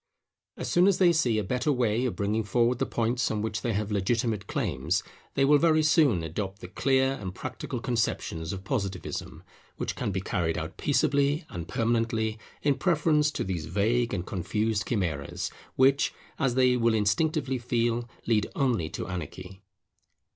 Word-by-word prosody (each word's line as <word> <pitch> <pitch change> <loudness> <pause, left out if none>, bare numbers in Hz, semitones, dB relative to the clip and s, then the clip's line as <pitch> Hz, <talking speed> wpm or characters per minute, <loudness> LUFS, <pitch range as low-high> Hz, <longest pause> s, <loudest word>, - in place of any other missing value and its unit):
As - - -4
soon 175 +2 +4
as 200 - +4
they 175 -2 +5
see 125 -9 +2
a 105 - +1
better 125 +9 0
way 120 -2 +1
of 125 - -1
bringing 105 +2 0
forward 120 +4 +1
the - - 0
points 120 +2 0
on 105 -1 -1
which 110 0 -2
they 120 - -1
have 105 +1 -1
such - - -2
legitimate 105 +1 0
claims, 80 +9 -1 0.3
they 135 - +4
will 145 +1 +5
very 155 -1 +4
soon 150 - +4
adopt 95 +5 -4
the 90 - -8
clear 130 +6 +2
and 95 -2 -5
practical 125 - -5
conceptions 110 - -1
of 95 -1 -6
Positivism, 100 -5 -4 0.3
which - - -3
can - - -2
be 95 - -1
carried 85 -3 -1
out - - -5
peaceably 140 +3 +1
and 85 -2 -6
permanently, 115 -1 0 0.2
in 140 -2 +2
preference 155 -2 +3
to - - -3
these 85 -5 -3
vague 115 +7 +1
and 90 -3 -2
confused 105 +3 -1
chimeras, 85 - -2 0.2
which, 135 +2 +3 0.2
as 125 -3 +1
they 130 -1 +4
will 115 -2 +2
instinctively 130 +6 +1
feel, 120 0 0 0.2
lead 110 -3 +2
only 120 - +1
to 80 - -5
anarchy. 90 +2 -7
115 Hz, 170 wpm, -28 LUFS, 100-130 Hz, 0.3 s, they